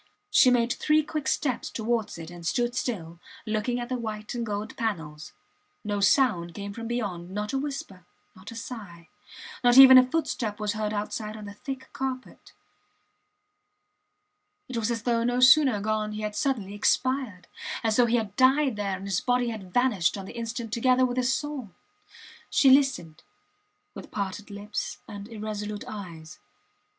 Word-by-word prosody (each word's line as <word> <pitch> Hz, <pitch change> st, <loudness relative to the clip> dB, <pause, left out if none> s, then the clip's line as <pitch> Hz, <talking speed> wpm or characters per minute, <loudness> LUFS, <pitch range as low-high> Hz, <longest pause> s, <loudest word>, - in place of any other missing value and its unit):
She 255 Hz, -, +6 dB
made 240 Hz, -1 st, +2 dB
three 305 Hz, 0 st, +2 dB
quick 305 Hz, -1 st, -4 dB
steps 260 Hz, -5 st, -1 dB
towards 225 Hz, -3 st, -2 dB
it 165 Hz, 0 st, -8 dB
and 175 Hz, -1 st, -10 dB
stood 240 Hz, +8 st, 0 dB
still, 170 Hz, -8 st, -3 dB, 0.3 s
looking 220 Hz, +3 st, -1 dB
at 240 Hz, -, -4 dB
the 255 Hz, -1 st, -3 dB
white 215 Hz, -2 st, -5 dB
and 240 Hz, -1 st, -2 dB
gold 210 Hz, -1 st, -4 dB
panels. 160 Hz, -9 st, -4 dB, 0.5 s
No 205 Hz, -1 st, -2 dB
sound 195 Hz, -, +2 dB
came 200 Hz, 0 st, -6 dB
from 230 Hz, +1 st, -6 dB
beyond, 200 Hz, -8 st, -3 dB
not 210 Hz, +5 st, -4 dB
a 270 Hz, -, +1 dB
whisper, 235 Hz, -, -6 dB, 0.3 s
not 185 Hz, +1 st, -11 dB
a 230 Hz, -, -9 dB
sigh; 200 Hz, -8 st, -9 dB, 0.5 s
not 245 Hz, +1 st, +5 dB
even 260 Hz, -1 st, +11 dB
a 255 Hz, 0 st, +2 dB
footstep 235 Hz, -9 st, -2 dB
was 210 Hz, 0 st, -1 dB
heard 215 Hz, -1 st, -2 dB
outside 215 Hz, +1 st, -4 dB
on 210 Hz, -, -9 dB
the 205 Hz, -, -8 dB
thick 260 Hz, +3 st, -8 dB
carpet. 260 Hz, -1 st, -5 dB, 2.2 s
It 255 Hz, -, -7 dB
was 230 Hz, -1 st, 0 dB
as 230 Hz, -2 st, -2 dB
though 235 Hz, -1 st, +1 dB
no 245 Hz, +1 st, +1 dB
sooner 260 Hz, -3 st, +6 dB
gone 215 Hz, 0 st, -1 dB
he 215 Hz, -, -5 dB
had 210 Hz, -1 st, -4 dB
suddenly 215 Hz, -8 st, -1 dB
expired 250 Hz, -2 st, 0 dB, 0.4 s
as 220 Hz, -2 st, +1 dB
though 245 Hz, -1 st, +5 dB
he 235 Hz, -, +2 dB
had 210 Hz, -3 st, -3 dB
died 265 Hz, -1 st, +3 dB
there 200 Hz, -2 st, -2 dB
and 195 Hz, -, -9 dB
his 195 Hz, -3 st, 0 dB
body 245 Hz, -1 st, +1 dB
had 205 Hz, -5 st, -7 dB
vanished 215 Hz, -6 st, +2 dB
on 195 Hz, -, -7 dB
the -, -, -10 dB
instant 230 Hz, -1 st, -5 dB
together 255 Hz, +2 st, +3 dB
with 245 Hz, 0 st, -3 dB
his 250 Hz, 0 st, +2 dB
soul. 285 Hz, -5 st, -3 dB, 0.8 s
She 270 Hz, -, +5 dB
listened, 265 Hz, -, +2 dB, 0.7 s
with -, -, -10 dB
parted 200 Hz, +1 st, -4 dB
lips 210 Hz, +1 st, -5 dB
and 205 Hz, -2 st, -8 dB
irresolute 210 Hz, -2 st, -5 dB
eyes. 170 Hz, -7 st, -9 dB
220 Hz, 170 wpm, -27 LUFS, 205-250 Hz, 2.2 s, even